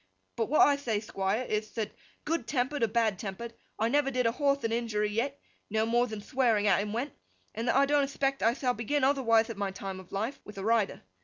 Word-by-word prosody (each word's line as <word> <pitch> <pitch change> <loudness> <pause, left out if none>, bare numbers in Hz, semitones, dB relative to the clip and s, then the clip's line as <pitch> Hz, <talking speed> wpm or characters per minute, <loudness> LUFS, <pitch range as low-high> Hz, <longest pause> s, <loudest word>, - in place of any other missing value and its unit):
But 225 - 0
what 305 - +4
I 285 -1 +6
thay, 230 -7 -1
Thquire, 205 +3 -2
ith, 215 0 -2
that 220 -3 -2 0.3
good 330 +2 -1
tempered 265 +1 -1
or 230 - +4
bad 220 -3 +1
tempered, 225 +3 -6 0.2
I 220 - +1
never 280 +2 +2
did 250 -2 0
a 230 - +4
horthe 280 +2 +1
a 225 0 0
injury 210 -3 -1
yet, 265 +6 -1 0.3
no 220 +1 +1
more 240 +2 +2
than 215 -2 -6
thwearing 230 -3 +1
at 200 -1 +4
him 205 0 -4
went, 240 +6 -3 0.4
and 225 +3 -3
that - - +2
I 275 +1 +5
don't 290 0 +3
expect 275 0 -1
I 230 +2 +3
thall 255 -3 0
begin 260 +5 -1
otherwithe 230 -5 +3
at 220 - -8
my 200 -1 -1
time 195 0 -6
of 185 - -14
life, 220 +8 -3
with 210 - -11
a 195 - -4
rider. 225 -2 +1
230 Hz, 235 wpm, -30 LUFS, 210-270 Hz, 0.4 s, I